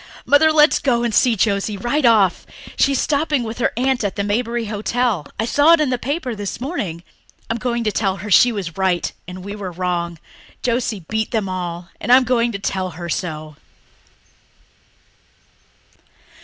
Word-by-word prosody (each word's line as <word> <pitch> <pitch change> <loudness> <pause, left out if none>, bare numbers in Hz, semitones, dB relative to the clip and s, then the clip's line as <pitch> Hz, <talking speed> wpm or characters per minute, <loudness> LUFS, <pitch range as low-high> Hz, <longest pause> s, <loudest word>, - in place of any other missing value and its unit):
Mother, 315 +2 +5
let 305 0 +6
us - - +1
go 240 -4 +1
and 235 -2 -1
see 240 +1 +4
Josie 200 0 0
right 245 +8 0
off. 205 -6 +3 0.3
She's 275 -2 +2
stopping 295 -2 0
with 225 +1 -6
her - - +1
aunt 260 -1 +1
at 200 - -2
the 200 - -1
Maberly 230 +3 -1
Hotel 215 - -1
I 225 - +1
saw 290 +7 +5
it 335 - +4
in 295 -4 +1
the 250 - -1
paper 280 -1 -3
this 205 -1 -5
morning. 205 - -4 0.5
I'm 230 - -2
going 240 0 -1
to 215 - 0
tell 195 -2 0
her 205 +2 -7
she 245 +6 +6
was 190 -7 -5
right 185 -2 0
and 180 0 -8
we 200 +1 -6
were 195 -3 -6
wrong. 175 -1 -2 0.5
Josie's 235 -5 -1
beat 220 0 -1
them 220 -4 -1
all, 175 -2 -5
and - - -2
I'm 255 +1 +7
going 240 -1 +1
to 200 - -4
tell 190 -2 -2
her 175 -1 -6
so!" 155 -4 -4
220 Hz, 180 wpm, -20 LUFS, 185-250 Hz, 0.5 s, I'm